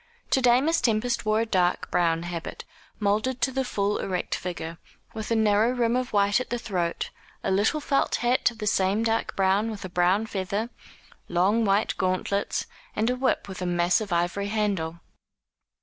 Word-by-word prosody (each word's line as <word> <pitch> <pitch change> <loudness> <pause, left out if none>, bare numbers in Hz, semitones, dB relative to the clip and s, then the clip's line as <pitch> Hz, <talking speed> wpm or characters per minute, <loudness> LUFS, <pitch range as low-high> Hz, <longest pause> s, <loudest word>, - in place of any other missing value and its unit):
To 265 - +3
day 245 0 +5
Miss 325 +3 +1
Tempest 235 -1 0
wore 215 +1 +3
a - - 0
dark 180 -5 0
brown 165 -1 +2
habit, 175 -1 -6 0.3
moulded 215 +5 0
to 265 - +2
the 265 +1 0
full 205 -4 -1
erect 185 -2 -2
figure, 170 -2 -5 0.3
with 220 -2 -5
a 230 - +2
narrow 220 +2 +3
rim 240 -1 +1
of 255 0 -1
white 205 +2 +3
at 255 - -5
the 240 - -1
throat, 180 -7 -2 0.3
a - - 0
little 205 +10 +2
felt 285 -2 +1
hat 245 +1 +2
of 235 - -12
the 215 - -4
same 200 +1 +2
dark 225 0 0
brown 195 +3 +2
with 210 -3 -6
a - - -6
brown 180 +4 +2
feather, 205 +3 -3 0.6
long 195 +6 +2
white 200 +2 +2
gauntlets, 185 +2 0 0.3
and 220 +3 +1
a - - 0
whip 260 +1 0
with 190 -2 -7
a 180 - -1
massive 175 +4 +1
ivory 175 +4 0
handle. 195 -6 -1
205 Hz, 180 wpm, -26 LUFS, 185-230 Hz, 0.6 s, day